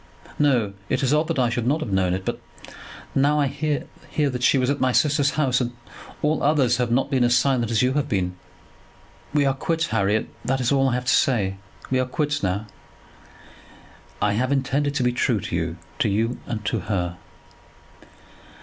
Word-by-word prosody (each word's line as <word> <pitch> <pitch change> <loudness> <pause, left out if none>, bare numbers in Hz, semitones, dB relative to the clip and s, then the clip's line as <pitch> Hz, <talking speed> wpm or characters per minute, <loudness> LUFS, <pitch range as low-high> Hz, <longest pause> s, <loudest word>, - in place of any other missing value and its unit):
"No. 125 -9 +2 0.2
It - - 0
is 135 +2 +2
odd 155 +1 +2
that 165 - -2
I 125 -2 +2
should 120 0 -1
not 150 +5 +2
have 140 -10 -4
known 95 -2 +2
it, 95 0 -6
as - - +1
I - - -18 0.4
now 145 +2 +3
hear 145 +2 -1 0.3
that 140 -5 +1
she 130 - +4
was 130 +1 +2
at 145 - -2
my 130 - +2
sister's 145 +1 +3
house; 130 -5 +2
but 125 -2 -1 0.5
all 150 +1 +1
others 140 -5 +3
have 125 -2 0
not 130 +4 +1
been 130 -2 +2
as 120 +1 +4
silent 125 -3 +1
as 115 -1 +2
you 130 +1 +2
have 145 0 -1
been. 90 -3 -1 1.0
We 145 -1 +2
are 135 - +2
quits, 165 +4 -1
Harry; 110 0 +1 0.2
that 135 +2 0
is 125 0 0
all 135 -1 +3
that 130 - +2
I - - +1
have 125 0 -3
to 125 - +3
say. 100 -7 +2 0.3
We 130 - +2
are 130 - 0
quits 145 +3 -1
now." 100 +3 -1 1.5
"I 105 0 +1
have 130 +5 0
intended 140 +1 0
to 130 - +1
be 125 - +2
true 120 -2 +1
to 85 - -4
you; 85 0 -2 0.2
to 110 - +2
you 115 +5 0
and 110 -2 -4
to - - 0
her." 90 -4 -2
125 Hz, 205 wpm, -23 LUFS, 110-140 Hz, 1.5 s, she